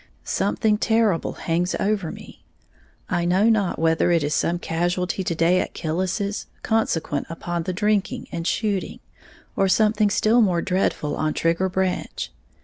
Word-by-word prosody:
Something 210 -1 0
terrible 220 -7 +1
hangs 175 +2 -1
over 195 -5 0
me, - - -12 0.6
I 175 -1 0
know 185 +6 +3
not 210 -5 +1
whether 165 +1 +2
it 170 -3 +3
is 145 +1 -1
some 175 - +1
casualty 175 +3 -1
to 170 - -2
day 170 +3 +3
at - - -6
Killis's, 185 +5 -2 0.2
consequent 165 -10 0
upon 170 +1 -3
the 175 - -3
drinking 215 +5 0
and 170 0 -3
shooting, 205 -4 -1 0.6
or 195 - +2
something 215 +1 +3
still 215 +4 +3
more 180 -5 +2
dreadful 180 -5 0
on 155 -1 -1
Trigger 170 +3 +1
Branch. 185 0 -2
185 Hz, 145 wpm, -23 LUFS, 170-210 Hz, 0.6 s, know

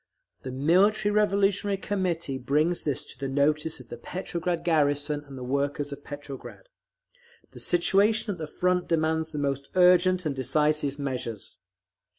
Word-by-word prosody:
The 130 - -6
Military 185 +10 +3
Revolutionary 200 -1 +2
Committee 175 -9 -2
brings 150 +7 +1
this 145 0 -1
to - - -6
the 135 - -2
notice 150 +3 +1
of 130 - -14
the 120 - -7
Petrograd 175 +2 -3
garrison 145 -2 +1
and 135 -1 -10
the 125 - -6
workers 140 +2 -1
of 140 - -11
Petrograd. 145 - -9 0.8
The - - -12
situation 205 +5 +2
at 180 - -6
the 155 - -4
Front 180 +3 0
demands 160 0 0
the 150 - -6
most 140 -1 -2
urgent 180 0 +5
and 145 -3 -1
decisive 150 +1 +1
measures. 125 -6 -5
155 Hz, 150 wpm, -27 LUFS, 140-180 Hz, 0.8 s, urgent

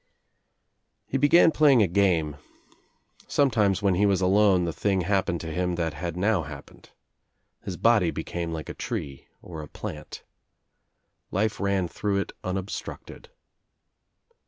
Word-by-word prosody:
He 135 - -2
began 160 +4 +6
playing 140 -7 +5
a - - +2
game. 85 -6 +1 0.9
Sometimes, 105 -8 +2
when 100 -2 +3
he 100 +3 +3
was 95 -2 +2
alone 95 -1 +3
the 85 - -3
thing 95 0 0
happened 95 -2 0
to 80 - -6
him 90 +1 -1
that 85 -2 -2
had 85 +3 -5
now 100 0 +2
hap 70 -3 -9
pened. - - -19 0.8
His 90 -3 -5
body 115 -7 +3
became 85 0 -4
like 80 -1 -5
a - - -6
tree 70 -1 -6 0.2
or 80 -3 -8
a 75 - -9
plant. 75 +2 -8 1.1
Life 105 +2 -1
ran 100 -2 0
through 100 +3 -2
It 100 - -2
unobstructed. 95 +2 -6
95 Hz, 140 wpm, -26 LUFS, 85-105 Hz, 1.1 s, began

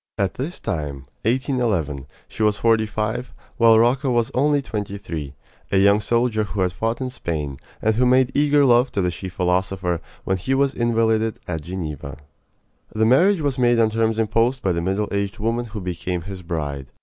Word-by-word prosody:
At 100 -1 0
this 150 +8 -5
time 70 -4 -4 0.2
1811 110 - 0 0.2
she - - -8
was 105 -1 +3
forty 110 -1 +2
five, 110 +4 -3 0.3
while 115 -1 +6
Rocca 125 +4 +3
was 120 -2 +1
only 145 +3 +3
twenty 105 -6 -4
three 80 -9 -6 0.4
a 100 - +3
young 100 +2 +5
soldier 115 0 +1
who 105 -2 -3
had 90 -1 +1
fought 115 +6 -2
in 130 -1 -3
Spain, 75 - -4 0.2
and 110 - +3
who 125 +3 +2
made 130 +1 +4
eager 145 0 +4
love 125 0 +4
to 100 - 0
the 90 -1 0
she 95 +2 -6
philosopher 90 -1 -1 0.2
when 95 - 0
he 130 +9 -1
was 140 0 +2
invalided 115 -2 +1
at 80 -3 -3
Geneva. 75 -5 -6 0.7
The 110 +1 +1
marriage 170 - +4
was 140 -3 -1
made 120 -1 +3
on 110 -1 +3
terms 110 0 +1
imposed 115 +4 +1
by 95 - +2
the 85 -1 -1
middle 95 +4 -1
aged 100 -1 -2
woman 115 +3 -1
who 110 -2 -7
became 90 -1 -3
his 95 0 -7
bride. 75 -6 -4
110 Hz, 185 wpm, -22 LUFS, 90-120 Hz, 0.7 s, while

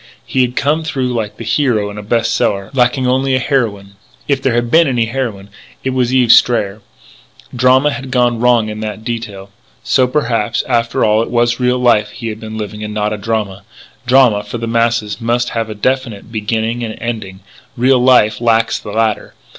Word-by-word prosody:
He 130 - 0
had 125 0 0
come 150 +3 0
through 130 -5 -2
like 110 -3 -4
the - - -7
hero 115 -4 0
in 105 - -8
a - - -5
best 115 +2 0
seller.... 100 0 -1
Lacking 125 0 +1
only 130 +1 +1
a - - +1
heroine.... 105 -7 -2 0.3
If 140 -2 0
there 130 -3 0
had 120 0 -1
been 165 0 +5
any 120 -4 +1
heroine 115 -5 -4 0.3
it 130 - -1
was 130 -1 0
Eve 125 -3 +4
Strayer. 105 -4 +3 0.7
Drama 130 +4 +3
had 135 -2 -6
gone 120 -2 +1
wrong 120 -2 +3
in 105 0 -6
that 110 0 -5
detail.... 105 -5 -6 0.3
So 130 -2 +2
perhaps, 120 -6 -1
after 115 -2 +1
all, 110 0 +3
it 115 - -3
was 120 0 +1
real 125 0 +1
life 120 -4 +2
he 115 +2 -6
had 110 0 -6
been 110 -1 -7
living 105 0 -6
and 105 0 -6
not 105 0 0
drama. 105 -3 -2 0.5
Drama, 125 -5 +4
for 105 +3 -6
the 115 - -4
masses, 115 -1 0
must 120 +1 0
have 115 -1 -3
a 110 - -6
definite 115 -1 -2
beginning 110 +2 -2
and 110 -1 -5
ending. 110 -5 -5 0.4
Real 130 +2 +3
life 120 -4 +3
lacks 115 -1 +2
the - - -9
latter. 110 -1 -1
115 Hz, 195 wpm, -15 LUFS, 110-125 Hz, 0.7 s, been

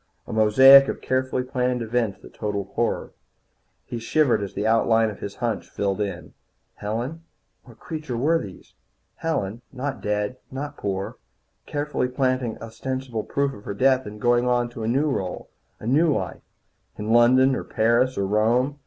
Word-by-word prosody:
A - - -7
mosaic 130 +6 +8
of - - -3
carefully 130 0 -1
planned 125 -2 -1
events 115 -3 -1
that - - -13
totalled 100 -2 -3
horror. - - -1 0.7
He 120 - -5
shivered 120 -1 +2
as 100 - -6
the 105 - -2
outlines 115 0 +3
of 105 - -11
his 100 - -6
hunch 115 -6 -3
filled 100 0 -2
in. 100 -4 -5 0.4
Helen 120 +10 -4 0.4
what 120 -3 -16
creatures 155 -6 -5
were 160 +7 +2
these? 95 - -10 0.4
Helen 115 -9 -2
not 135 +1 -4
dead, 105 +4 -1
not 145 +2 -5
poor, 95 -4 -4 0.5
carefully 145 -3 -1
planting 130 -2 -1
ostensible 130 0 -4
proof 140 -1 -1
of 105 - -13
her 100 - -4
death 130 +2 +3
and 105 +1 -9
going 120 +2 +2
on 120 -1 +1
to 120 - -9
a 110 - -2
new 135 +6 +2
role, 95 -10 -3 0.3
a - - -10
new 150 +7 +3
life, 95 -10 -3 0.6
in 105 +2 -1
London 130 +3 +5
or - - -3
Paris 120 +4 +1
or 100 - 0
Rome. 120 +8 +1
120 Hz, 165 wpm, -24 LUFS, 105-130 Hz, 0.7 s, mosaic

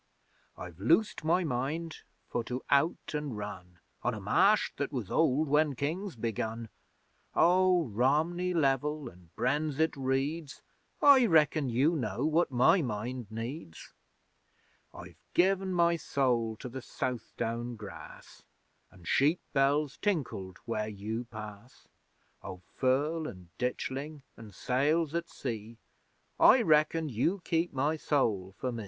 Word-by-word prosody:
I've 90 -2 -9
loosed 165 - +2
my 175 +4 +2
mind 155 +4 -3 0.3
for 120 - -2
to 125 +2 -4
out 140 +5 +1
an' 150 -5 -3
run 95 -4 -8 0.2
On - - -1
a - - -6
Marsh - - +3
that - - -2
was - - -4
old 150 +5 +2
when 150 0 +2
Kings 165 +7 -3
begun: 115 0 -3 0.7
Oh, 180 0 +4
Romney 150 - +1
level 150 -3 0
an' 90 -2 -20
Brenzett 150 +5 0
reeds, 135 +3 -2 0.4
I 270 -4 +7
reckon 155 -4 +3
you 135 +8 +2
know 125 -1 -2
what 160 +2 +2
my 130 +8 +4
mind 120 -1 -4
needs! 115 - -7 1.0
I've - - -12 0.2
given 190 +1 +2
my 170 -1 +3
soul 120 -7 0
to - - -5
the 130 +2 -7
Southdown 120 -1 -4
grass, 105 -3 -11 0.5
An' 90 - -18
sheep 145 - +2
bells 140 +1 +2
tinkled 130 - -2
where 110 -2 -2
you 110 +3 -5
pass. 110 +1 -11 0.5
Oh, 90 -1 -9
Firle 150 +5 +1
an' 90 -3 -13
Ditchling 135 +4 -3
an' 115 -2 -11
sails 140 - 0
at 170 0 -2
sea, 115 -3 -6 0.6
I 250 -1 +7
reckon 155 -1 +3
you 145 - 0
keep 165 +1 0
my 145 +4 0
soul 105 -12 0
for 130 - -2
me! 115 - -5
135 Hz, 130 wpm, -30 LUFS, 115-160 Hz, 1.0 s, I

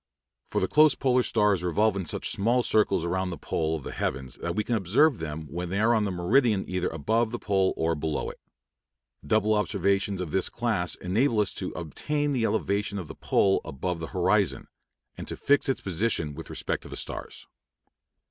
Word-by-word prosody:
For - - -1
the - - +1
close 155 -3 +5
polar 130 -1 +2
stars 105 -6 +2
revolve 105 +4 +2
in 95 -4 -3
such - - -2
small 120 +5 +1
circles 100 -7 +2
around 95 +2 -1
the 85 - -5
pole 80 +3 -1
of 75 - -6
the - - -6
heavens 65 -1 -3
that 85 0 -4
we 105 - 0
can 120 - -2
observe 115 - +3
them 80 0 -5
when 85 +4 -5
they 95 +3 -1
are 115 +2 +4
on 110 -2 +2
the 100 - -1
meridian 105 +4 +2
either 90 -1 -1
above 110 +9 0
the 120 - -4
pole 95 -4 +1
or 80 +1 +1
below 80 -1 -2
it. - - -18 0.8
Double 110 -1 +2
observations 100 -1 0
of 90 -4 -4
this 95 +2 +2
class 110 -7 0
enable 110 +6 +1
us 105 - +1
to 95 - -4
obtain 145 - -2
the 120 -4 +1
elevation 100 -2 -1
of 90 -5 -5
the - - -6
pole 95 -1 +2
above 85 +6 -4
the 80 - -5
horizon, 95 +2 +1 0.5
and - - -6
to - - -4
fix 145 0 +3
its 135 - 0
position 90 -5 -1
with 80 +3 -9
respect - - -2
to - - -12
the - - -7
stars. - - -5
100 Hz, 200 wpm, -27 LUFS, 85-110 Hz, 0.8 s, close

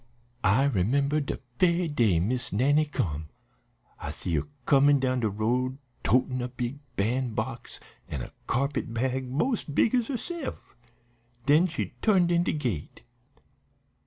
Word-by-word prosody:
"I 105 +7 +4
remember 140 +5 +2
de 140 - -3 0.2
ve'y 175 -1 +3
day 115 - +2
Miss 120 +8 -1
Nannie 145 +8 +3
come. 80 - -2 0.7
I - - -5
see 85 - -4
her 75 -2 0 0.2
comin' 140 0 +5
down 130 -1 +1
de 110 -3 +1
road 125 +6 0 0.3
totin' 125 +3 +2
a 125 - -2
big 125 +2 -4 0.2
ban'box, 120 +3 -2 0.3
an' 65 -4 -3
a - - -9 0.2
carpet 140 -1 -1
bag 130 +1 -1
mos 230 - +1
's - - -9
big 155 - +2
's 245 -3 +2
herse'f. 285 +3 -4 0.9
Den 155 +6 +5
she 165 -2 -4
turned 185 -5 +4
in 170 0 +4
de 175 - 0
gate. 120 - -3
130 Hz, 145 wpm, -28 LUFS, 115-150 Hz, 0.9 s, comin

